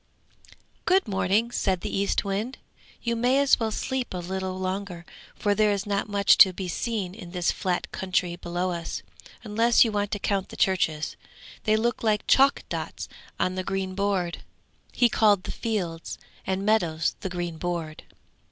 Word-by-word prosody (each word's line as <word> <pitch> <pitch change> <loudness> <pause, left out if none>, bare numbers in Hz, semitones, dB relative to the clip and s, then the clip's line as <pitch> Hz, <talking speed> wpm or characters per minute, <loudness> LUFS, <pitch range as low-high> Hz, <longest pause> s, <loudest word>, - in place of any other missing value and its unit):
'Good 375 -5 +3
morning,' 205 +3 +1
said 190 -6 0
the - - -3
Eastwind. 200 +4 -1 0.5
'You 235 -1 0
may 245 +3 +2
as 280 -2 +4
well 225 -1 0
sleep 255 0 -3
a - - -2
little 185 +1 -3
longer, 185 -2 -4 0.3
for 205 - +1
there 215 +1 +3
is 200 0 -1
not 200 0 -1
much 200 -1 +4
to 190 - +9
be 185 0 -5
seen 195 0 -2
in 185 -4 -10
this 180 -1 +1
flat 180 -2 -2
country 185 -2 -1
below 175 +1 -2
us, 170 -1 -4 0.4
unless 230 +2 +4
you 225 - 0
want 205 -1 -1
to 205 - -2
count 195 -1 -1
the - - -10
churches. 160 -5 +1 0.5
They 215 - +4
look 235 +2 0
like 215 -2 +1
chalk 275 +1 +4
dots - - -5 0.3
on 185 - +1
the 185 0 -3
green 195 0 -2
board.' 190 -3 -1 0.5
He 245 - +4
called 210 -4 +3
the - - -5
fields 180 -8 -3 0.3
and 190 +1 -1
meadows 170 -7 +1
'the 190 - -4
green 175 -2 -4
board.' 170 -3 -3
195 Hz, 170 wpm, -26 LUFS, 180-215 Hz, 0.5 s, to